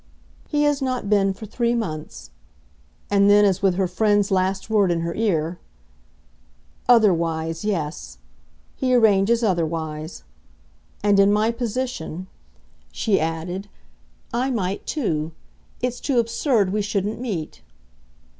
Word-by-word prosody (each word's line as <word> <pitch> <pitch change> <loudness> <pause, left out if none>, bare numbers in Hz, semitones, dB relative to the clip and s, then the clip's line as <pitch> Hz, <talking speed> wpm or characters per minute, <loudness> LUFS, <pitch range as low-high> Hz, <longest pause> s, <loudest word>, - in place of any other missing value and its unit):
"He 295 -1 +1
has 290 -1 +2
not 255 -6 -2
been 195 -2 +3
for 195 +3 -8
three 235 +3 0
months." 155 - -5 0.8
And 200 0 +4
then 205 0 +6
as 195 -2 +1
with 190 -2 +3
her 190 0 +1
friend's 205 +2 +1
last 190 0 0
word 210 -4 +3
in 170 -1 0
her 170 0 -2
ear: 175 -6 -1 1.3
"'Otherwise' 165 -7 +3
yes. 170 -7 -3 0.6
He 255 -2 +1
arranges 220 0 +4
otherwise. 160 -4 -2 0.8
And 205 -1 +4
in 200 +1 +5
my 215 +2 +2
position," 230 -7 -4 0.7
she 200 - +1
added, 165 +5 -3 0.6
"I 250 +3 0
might 200 -6 -2
too. 165 - -2 0.5
It's 250 0 -1
too 270 -4 -1
absurd 230 -3 +1
we 210 - +1
shouldn't 205 +2 -2
meet." 185 -11 -4
200 Hz, 125 wpm, -23 LUFS, 175-230 Hz, 1.3 s, then